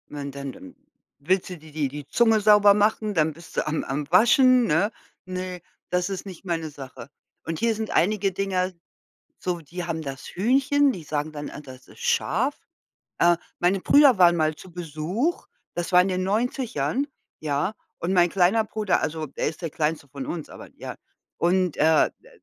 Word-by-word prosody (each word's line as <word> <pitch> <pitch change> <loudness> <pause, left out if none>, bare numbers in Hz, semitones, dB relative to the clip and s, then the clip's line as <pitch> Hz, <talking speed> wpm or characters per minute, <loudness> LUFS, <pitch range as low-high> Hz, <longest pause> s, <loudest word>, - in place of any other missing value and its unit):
Wann 140 -1 -6
denn 140 0 -6
denn 275 - -13 0.4
willst 180 +7 0
du 180 - -7
dir 155 0 -15
die 150 -1 -1
die 145 +1 -8
Zunge 225 +3 +3
sauber 205 -1 +7
machen, 210 +1 +1
dann 160 -3 +2
bist 170 +2 -14
du - - +1
am 155 0 -1
am 140 +2 -4
Waschen, 250 +5 +6
ne? 190 +5 +2 0.3
Ne, 185 -1 -5 0.3
das 180 +1 0
ist 195 0 -5
nicht 190 -1 -10
meine 165 -3 -2
Sache. 135 -3 -10 0.4
Und 165 -1 -3
hier 230 -1 +1
sind 220 0 -4
einige 200 +1 +2
Dinger 185 -1 -1 0.7
so, 180 -1 -2
die 170 +3 -7
haben 165 -2 -3
das 135 -3 -7
Hühnchen, 270 +7 +3
die 175 - -8
sagen 150 0 -3
dann: 145 -1 -6
„Ah, - - -9
das 130 -3 -13
ist - - -16
scharf.“ 470 - +1 0.6
Äh, 175 0 +5 0.2
meine 180 +2 +2
Brüder 280 +3 +6
waren 175 -2 +6
mal 155 -2 +1
zu 185 - -13
Besuch, 175 - -2 0.3
das 175 +2 -3
war 180 - +8
in 185 - 0
den 185 0 -1
90ern, 225 - -1 0.3
ja. 150 +6 -1 0.3
Und 170 - -2
mein 175 -1 +4
kleiner 195 +5 +3
Bruder 215 -3 0
also, 155 0 -2
der 140 - -3
ist 155 +3 -5
der 165 - -3
kleinste 150 -1 -2
von 135 0 -6
uns, 165 -3 -5
aber - - -11
ja. - - -7 0.4
Und, 180 -1 +1
äh, 155 +1 +4
d - - -19
180 Hz, 185 wpm, -25 LUFS, 155-210 Hz, 0.7 s, war